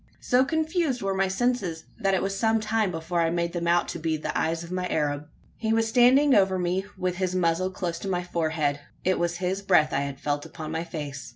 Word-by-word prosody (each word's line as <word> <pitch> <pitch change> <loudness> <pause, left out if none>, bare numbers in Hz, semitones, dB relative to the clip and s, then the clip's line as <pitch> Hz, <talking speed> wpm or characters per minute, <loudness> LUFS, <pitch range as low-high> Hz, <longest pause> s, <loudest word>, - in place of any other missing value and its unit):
So 250 +1 +3
confused 315 - 0
were 195 0 0
my 190 0 +1
senses, 190 -5 -1 0.2
that 195 -1 +2
it 185 - 0
was 195 0 -1
some 220 +2 +2
time 215 -1 0
before 170 0 -2
I 165 - +2
made 170 0 -1
them 170 -1 -2
out 175 +1 +3
to - - -4
be 160 0 -1
the 150 - -4
eyes 165 +1 0
of 170 - -10
my 185 0 -1
Arab. 150 -2 -1 0.3
He 220 -1 0
was 225 0 +2
standing 255 +5 +5
over 190 -3 +4
me, 180 +2 -1
with 180 -1 -2
his 185 -1 -1
muzzle 180 +1 +1
close 175 -2 -4
to - - -6
my 180 -2 -1
forehead. 155 -4 -1 0.2
It 185 0 +1
was 175 0 0
his 190 +2 -2
breath 180 -6 +3
I - - +2
had 140 -1 -4
felt 145 0 -1
upon 155 -1 -7
my 165 +1 -2
face. 145 -6 -6
180 Hz, 230 wpm, -26 LUFS, 165-195 Hz, 0.3 s, standing